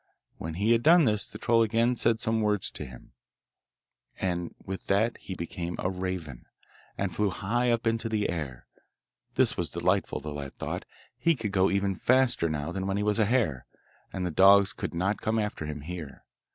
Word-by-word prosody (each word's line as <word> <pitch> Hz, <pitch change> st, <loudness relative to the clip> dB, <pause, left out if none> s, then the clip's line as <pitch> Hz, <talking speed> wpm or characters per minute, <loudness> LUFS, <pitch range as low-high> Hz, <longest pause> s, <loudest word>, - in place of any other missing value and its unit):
When 80 Hz, 0 st, -5 dB
he 105 Hz, +6 st, +1 dB
had 115 Hz, 0 st, +4 dB
done 165 Hz, +3 st, +6 dB
this 105 Hz, -3 st, 0 dB
the -, -, -9 dB
troll 115 Hz, 0 st, +3 dB
again 115 Hz, +2 st, +2 dB
said 115 Hz, -1 st, +2 dB
some 115 Hz, -1 st, +1 dB
words 105 Hz, -3 st, 0 dB
to -, -, -6 dB
him, 65 Hz, -1 st, -13 dB, 1.1 s
and 90 Hz, -2 st, -2 dB
with 95 Hz, 0 st, -6 dB
that 110 Hz, +4 st, +2 dB
he 95 Hz, -, -7 dB
became 85 Hz, 0 st, -5 dB
a 90 Hz, -, -1 dB
raven, 90 Hz, -8 st, -5 dB, 0.5 s
and 95 Hz, -3 st, -2 dB
flew 105 Hz, -1 st, +2 dB
high 115 Hz, +7 st, 0 dB
up 115 Hz, 0 st, +1 dB
into 115 Hz, 0 st, 0 dB
the 105 Hz, -2 st, 0 dB
air. 75 Hz, -8 st, -5 dB, 0.7 s
This -, -, +3 dB
was -, -, -1 dB
delightful, 90 Hz, +3 st, 0 dB
the 75 Hz, +1 st, -6 dB
lad 70 Hz, -2 st, -7 dB
thought; -, -, -4 dB, 0.3 s
he 165 Hz, -1 st, +3 dB
could 110 Hz, -6 st, -4 dB
go 95 Hz, -1 st, +3 dB
even 100 Hz, 0 st, +1 dB
faster 125 Hz, -5 st, +2 dB
now 75 Hz, +1 st, -3 dB
than 95 Hz, +2 st, -3 dB
when 100 Hz, 0 st, 0 dB
he 105 Hz, -, 0 dB
was 105 Hz, +1 st, +1 dB
a 110 Hz, -, +4 dB
hare, 105 Hz, -, 0 dB, 0.4 s
and 90 Hz, -1 st, -3 dB
the 90 Hz, -, -1 dB
dogs 100 Hz, +4 st, +6 dB
could -, -, -5 dB
not 95 Hz, +5 st, 0 dB
come 110 Hz, +1 st, 0 dB
after 105 Hz, -8 st, -2 dB
him 75 Hz, -1 st, -5 dB
here. 80 Hz, -2 st, -8 dB
100 Hz, 195 wpm, -28 LUFS, 85-110 Hz, 1.1 s, done